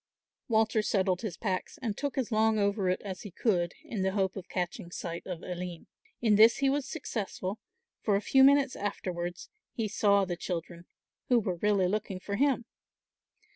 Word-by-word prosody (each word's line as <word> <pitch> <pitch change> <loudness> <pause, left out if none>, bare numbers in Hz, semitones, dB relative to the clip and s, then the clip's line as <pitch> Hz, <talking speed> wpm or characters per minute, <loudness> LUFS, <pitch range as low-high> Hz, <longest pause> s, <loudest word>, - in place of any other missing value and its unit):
Walter 220 -1 +3
settled 190 -3 +1
his 210 -7 -4
packs 190 -4 -3
and 225 -5 -2
took 285 +3 -3
as 250 -3 -1
long 220 0 +3
over 200 -2 +1
it 185 - 0
as 190 -3 -6
he 205 - -7
could 180 -3 0
in 245 -11 -4
the 190 0 +1
hope 190 -2 0
of 190 -2 -8
catching 175 -1 -3
sight 170 -1 -6
of 180 -3 -5
Aline. 180 -2 -5 0.4
In 215 -4 +4
this 225 +2 +7
he 270 -1 +2
was 280 -1 -1
successful, 210 - -4 0.4
for 205 - +2
a - - +3
few 265 +5 +5
minutes 275 -1 +5
afterwards 175 -3 -4 0.3
he 225 -3 -1
saw 200 -1 +3
the 180 -1 -3
children, 170 0 -5 0.4
who 250 - +5
were 185 -5 -2
really 200 0 +2
looking 200 -1 -2
for 200 +2 -4
him. 265 -1 +2
200 Hz, 180 wpm, -30 LUFS, 185-225 Hz, 0.4 s, this